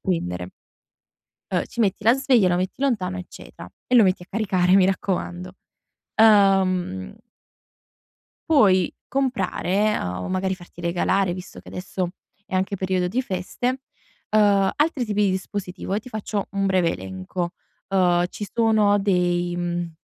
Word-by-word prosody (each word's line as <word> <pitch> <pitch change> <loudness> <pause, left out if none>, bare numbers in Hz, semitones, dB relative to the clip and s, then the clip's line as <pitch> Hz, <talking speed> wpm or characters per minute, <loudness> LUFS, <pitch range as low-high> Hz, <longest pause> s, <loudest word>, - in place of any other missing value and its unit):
prendere 90 - -2 1.0
uhm, - - +1
ci - - -10
metti 200 -2 +1
la 230 +3 +6
sveglia, 255 -6 +3
lo 175 - +2
metti 185 +8 -3
lontano, 190 -9 0
eccetera, 180 - -10 0.2
e 250 - +2
lo 235 - +8
metti 185 -2 +1
a - - -15
caricare, 185 -4 +2
mi 190 -1 +6
raccomando. 185 -1 -2 0.7
Uhm 190 - +3 1.3
puoi 190 - +4
comprare, 215 -6 0
uhm, 90 0 -4
o - - -5
magari, 190 0 0
farti 175 -1 -13
regalare, 175 +2 +1
visto 180 0 -9
che - - -18
adesso 180 0 -4 0.4
è - - -12
anche 190 +2 0
periodo 185 -1 0
di 220 +8 -1
feste, 245 +8 -3 0.5
uhm, 205 -2 +4
altri 295 -3 +1
tipi 210 -2 0
di 195 - +2
dispositivo, 190 0 -4
e 210 - 0
ti 255 - -13
faccio 210 -3 -3
un 195 0 0
breve 185 -3 +2
elenco. 95 - -5 0.4
Uhm, 180 -2 +3
ci 205 - -6
sono 215 -3 +3
dei 175 -2 +1
mhmm, 175 -1 -3
190 Hz, 145 wpm, -23 LUFS, 180-210 Hz, 1.3 s, lo